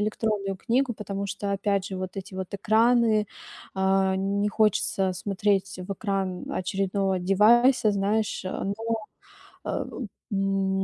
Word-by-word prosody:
электронную 210 -2 -1
книгу, 245 +4 +1
потому 200 -1 -4
что, 200 0 -3
опять 200 -1 0
же, 190 - -5
вот 185 +1 -5
эти 190 0 -7
вот 190 0 -5
экраны, 220 +1 +3 0.5
э, 190 0 +2
не 200 +2 0
хочется 200 -3 +1
смотреть 195 0 0
в 200 - -3
экран 195 -3 -2
очередного 190 0 0
девайса, 215 +5 +5
знаешь. 200 +1 0
Но, 195 +1 -2 0.9
э, - - -2 0.5
м, 195 -1 +1
195 Hz, 120 wpm, -26 LUFS, 190-210 Hz, 0.9 s, девайса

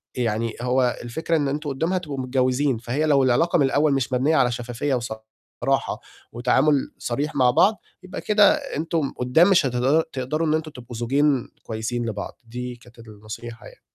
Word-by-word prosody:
يعني 115 -2 -1
هو 125 0 +1
الفكرة 160 +8 -2
إن 145 -2 0
أنتم 145 +2 -3
قُدّام 160 +6 -1
هتبقوا 155 -7 -3
متجوّزين، 130 +1 +1
فهي 125 +7 -2
لو 140 -3 +4
العلاقة 130 +8 +3
من 140 - +4
الأول 145 +2 +2
مش 135 -1 -1
مبنيّة 140 +6 +2
على 125 -4 +3
شفافية 120 +3 -3
وصراحة 110 -2 -3 0.3
وتعامل 130 +4 +2
صريح 145 +6 -3
مع 125 -2 +4
بعض، 210 - +3 0.2
يبقى 185 - -7
كده 210 -1 +5
أنتم 165 - -2
قُدّام 125 +9 +4
مش 185 -5 +4
هتقدد 135 +5 +2
تقدروا 145 +5 -3
إن 155 - +2
أنتم 155 0 -2
تبقوا 120 -3 -10
زوجين 135 +3 +1
كويسين 115 +2 -3
لبعض، 105 -2 -6
دي 125 +1 -6
كانت 120 0 -19
النصيحة 110 +1 -10
يعني. - - -14
130 Hz, 170 wpm, -23 LUFS, 120-150 Hz, 0.3 s, كده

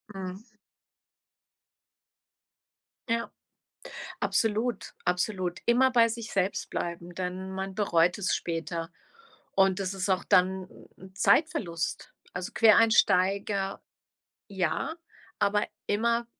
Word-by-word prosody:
Mhm. 185 -1 -5 2.7
Ja. 230 0 -1 0.9
Absolut, 225 0 0
absolut. 180 0 -1
Immer 255 +2 +4
bei 235 -2 +5
sich 230 -1 -5
selbst 195 0 -1
bleiben, 170 0 -5
denn 185 +1 -4
man 190 0 -4
bereut 175 -4 +2
es 195 - +1
später. 165 0 -4 0.6
Und 195 0 +3
das 195 0 -2
ist 190 0 -2
auch 185 - +1
dann 185 0 +2 0.3
'n 190 +1 -14
Zeitverlust. 195 - +1 0.2
Also, 180 0 -5
Quereinsteiger, 200 -3 +3 0.7
ja, 190 - -1 0.4
aber 205 +1 +2 0.2
immer 235 +3 +1
190 Hz, 95 wpm, -28 LUFS, 180-215 Hz, 2.7 s, bei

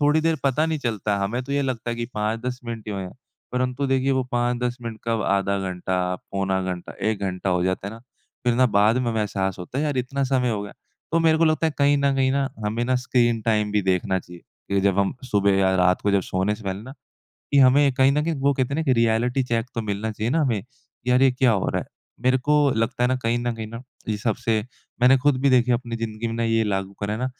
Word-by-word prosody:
थोड़ी 150 +2 +3
देर 165 0 +1
पता 140 +3 +2
नहीं 160 -1 -1
चलता, 110 -5 -1
हमें 120 +6 -2
तो 140 - -5
ये 140 0 +1
लगता 120 -3 -3
है 120 - -3
कि 120 0 -3
5-10 115 +4 -2
मिनट 115 -2 -6
ही 105 - -3
हुए 95 -1 -3
हैं। 90 - -8 0.4
परंतु 125 +2 -1
देखिए 135 0 +1
वो 130 0 +1
5-10 120 0 0
मिनट 115 -2 -6
कब 115 -1 0
आधा 100 0 +1
घंटा, 90 0 -2 0.2
पौना 95 -1 0
घंटा, 90 -1 -5 0.2
1 105 - -3
घंटा 95 0 -2
हो 90 -1 +1
जाता 95 +1 -1
है 100 - -8
ना 115 - -11 0.5
फ़िर 120 -1 +3
ना 130 +1 +4
बाद 105 +2 +3
में 120 -2 0
हमें 110 -1 -1
एहसास 95 -3 -2
होता 90 +9 -5
है 150 - +1
यार 145 -3 -1
इतना 135 +2 -1
समय 125 -2 +1
हो 105 -2 -1
गया। 100 - -8 0.4
तो 165 - +4
मेरे 160 -1 +4
को 165 - +4
लगता 155 0 +2
है 160 - -1
कहीं 145 0 +4
न 140 -1 +2
कहीं 130 0 +2
ना 135 0 +1 0.2
हमें 115 +3 -1
ना 130 +1 +1
स्क्रीन 120 -2 +1
टाइम 105 -2 +1
भी 105 - +2
देखना 95 0 +1
चाहिए 90 -1 -13 0.3
कि 100 0 +2
जब 100 0 +2
हम 100 +6 +1 0.2
सुबह 100 -1 +3
या 95 -1 +3
रात 90 0 +3
को 100 - +2
जब 100 -1 +3
सोने 95 +4 -1
से 105 - -12
पहले 95 +1 -3
ना 130 +4 -9 0.6
कि 140 - +5
हमें 135 +1 +5
कहीं 135 +1 +4
न 150 +1 +1
कहीं 165 -1 0
वो 140 +1 +3
कहते 130 +1 -1
हैं - - -1
ना 160 - 0
कि 130 - +3
रियलिटी 120 +3 +2
चेक 115 -1 -1
तो 115 - -1
मिलना 105 +1 -3
चाहिए 110 +3 -2
ना 160 +2 +2
हमें, 115 -9 0
कि 125 0 -10
यार 125 +1 +4
ये 135 - +6
क्या 125 0 +3
हो 95 - 0
रहा - - -1
है? - - -9 0.3
मेरे 130 +1 +3
को 150 +4 +1 0.2
लगता 115 +2 0
है - - +3
ना 130 - +2
कहीं 115 +1 +1
न 120 0 -1
कहीं 110 -1 -6
ना 115 +2 -8 0.3
इन 105 - 0
सब 110 +1 -1
से 115 -3 0 0.4
मैंने 130 +2 +7
ख़ुद 145 0 +2
भी 140 - +3
देखी 125 -1 +4
है 120 - +4
अपनी 120 -1 -6
जिंदगी 115 0 -4
में 115 - -4
ना 115 - -1
ये 115 0 +2
लागू 95 -1 -2
करा 100 +1 -2
है - - -5
ना 130 - 0
115 Hz, 270 wpm, -23 LUFS, 100-130 Hz, 0.6 s, मैंने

